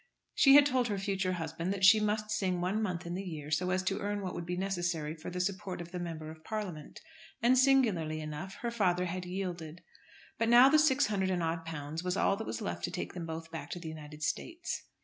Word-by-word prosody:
She 275 -1 +7
had 290 0 +9
told 255 -3 +2
her 205 -3 -1
future 195 -1 -1
husband 165 +1 -3
that 195 -1 +2
she 215 +2 +8
must 215 0 -1
sing 190 -4 0
one 185 +5 0
month 180 -4 -2
in 170 - -4
the 185 - -3
year 155 -6 -7
so 180 +4 +1
as 185 0 +1
to 195 +2 -1
earn 205 0 -2
what 185 - -3
would 175 - -5
be 180 0 -2
necessary 175 -5 -1
for 160 0 -8
the 180 0 -5
support 190 0 -2
of 170 0 -8
the 180 - -4
Member 160 -3 -5
of 160 0 -14
Parliament, 185 -7 -5 0.4
and 240 +3 +4
singularly 230 - +3
enough 155 +5 -6
her 235 - -2
father 180 -6 +1
had 180 0 -4
yielded. 175 -3 -5 0.6
But 230 - +2
now 245 +3 +8
the 310 +2 +5
six 285 -2 +4
hundred 190 -3 0
and 180 -2 0
odd 165 0 -2
pounds 155 +1 -5
was 180 +1 -1
all 200 - +3
that 220 - -5
was 110 - -4
left 85 0 -4
to - - -5
take - - -4
them 170 -2 -5
both 160 0 -6
back 165 - -6
to 175 - -5
the 165 -2 -6
United 150 -1 -9
States. 335 - -3
180 Hz, 240 wpm, -32 LUFS, 165-205 Hz, 0.6 s, had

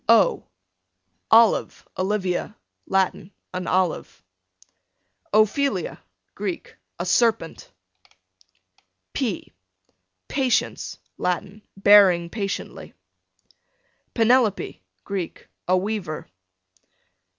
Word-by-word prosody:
O - - +5 0.9
Olive, 225 -1 +4
Olivia, 190 +1 -1 0.3
Latin, 190 -1 0 0.2
an 180 -1 -4
olive. 185 -2 -1 1.1
Ophelia, 215 - +1 0.3
Greek, 195 -3 -5 0.2
a 175 - -3
serpent. 220 -3 +1 1.4
P 235 -9 -3 0.7
Patience, 260 -4 0 0.2
Latin, 190 +3 -2 0.2
bearing 195 -4 +6
patiently. 200 -3 -5 1.2
Penelope, 230 - +2 0.2
Greek, 190 -4 -5 0.2
a 185 +1 +4
weaver. 190 -5 -3
195 Hz, 65 wpm, -23 LUFS, 180-220 Hz, 1.4 s, bearing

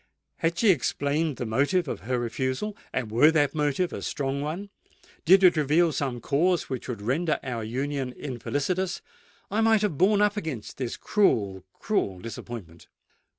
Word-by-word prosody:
Had 165 +1 0
she 220 0 +5
explained 145 -1 0
the 125 - -3
motive 145 +10 +1
of - - -4
her 125 +4 -2
refusal, 130 - -2 0.2
and 120 -4 -3
were 125 +8 +6
that 150 -3 +2
motive 150 +3 0
a - - -5
strong 140 -1 -2
one,—did 190 +2 -1
it 180 -2 +7
reveal 155 +3 +3
some 135 -4 -2
cause 170 +7 +1
which 130 - -4
would 110 -5 -5
render 150 +8 0
our 120 -4 -3
union 135 +3 -2
infelicitous,—I 175 - -3
might 220 -1 +4
have 180 -10 -1
borne 205 +2 +4
up 210 0 +2
against 155 - -5
this 125 -3 -3
cruel—cruel 100 - 0
disappointment. 100 -4 -8
145 Hz, 150 wpm, -26 LUFS, 125-180 Hz, 0.2 s, it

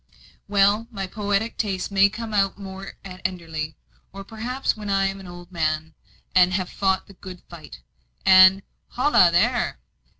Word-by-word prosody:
Well, 205 +2 +2
my 195 -5 -5
poetic 205 +3 -2
tastes 195 -3 -2
may 200 0 +5
come 220 +1 -7
out 195 -2 +1
more 195 -1 -9
at 185 -1 -10
Enderley. 160 -4 -4 0.4
Or 195 +1 -9
perhaps 235 +6 -3
when 210 -2 -7
I 195 0 +2
am 195 0 -3
an 190 - -11
old 175 0 -11
man, 155 -2 -2 0.4
and 185 -1 +5
have 185 -2 -2
fought 190 -1 0
the 195 - -15
good 185 -1 -11
fight, 155 - -12 0.4
and 190 +1 +7 0.3
holloa, 250 -9 +4
there! 240 +8 +1
195 Hz, 160 wpm, -23 LUFS, 180-205 Hz, 0.4 s, and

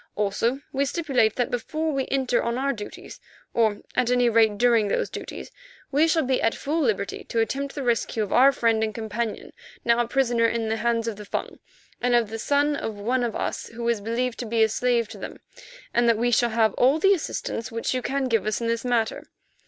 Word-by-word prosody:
Also, 230 +6 0
we 275 +1 +1
stipulate 270 -7 +1
that 245 - -1
before 310 +6 -2
we 270 -1 -1
enter 260 -3 +1
on 235 +1 -2
our 275 +1 0
duties, 210 -2 -9 0.3
or 220 -3 +1
at 250 -1 +2
any 245 -1 +3
rate 220 -2 +3
during 235 -2 +3
those - - -1
duties, - - -7 0.4
we 295 +4 +4
shall 320 0 +2
be 260 0 0
at 225 - +1
full 310 +4 -1
liberty 205 -7 -1
to 230 - -2
attempt 275 +5 -1
the 280 - -3
rescue 230 -2 0
of 205 - -4
our 265 +3 +7
friend 230 -4 +1
and 215 -1 -2
companion, 220 0 -4 0.3
now 235 0 +3
a 240 - +1
prisoner 240 -2 +2
in 230 -1 -1
the 225 - 0
hands 230 0 0
of 220 -3 -3
the 210 - -8
Fung, - - -4 0.4
and 245 0 +2
of 230 -3 +2
the 225 - -4
son 290 +4 +2
of 225 -6 -4
one 245 +5 -1
of 235 -2 -2
us - - -3
who 235 +1 -5
is 235 -3 +1
believed 230 +3 -2
to 240 - -4
be 225 0 +2
a 220 - +3
slave 240 0 +1
to - - -11
them, - - -8 0.5
and 240 0 +3
that 230 - +3
we 240 +2 +1
shall 240 +1 +3
have 220 -1 +2
all 265 +5 +5
the 390 +5 +4
assistance 260 - -4
which 230 +2 -2
you 255 - -1
can 275 +2 -1
give 225 -4 +1
us 215 - 0
in 235 - -3
this 230 0 -1
matter. 240 -3 -1
235 Hz, 225 wpm, -25 LUFS, 225-260 Hz, 0.5 s, our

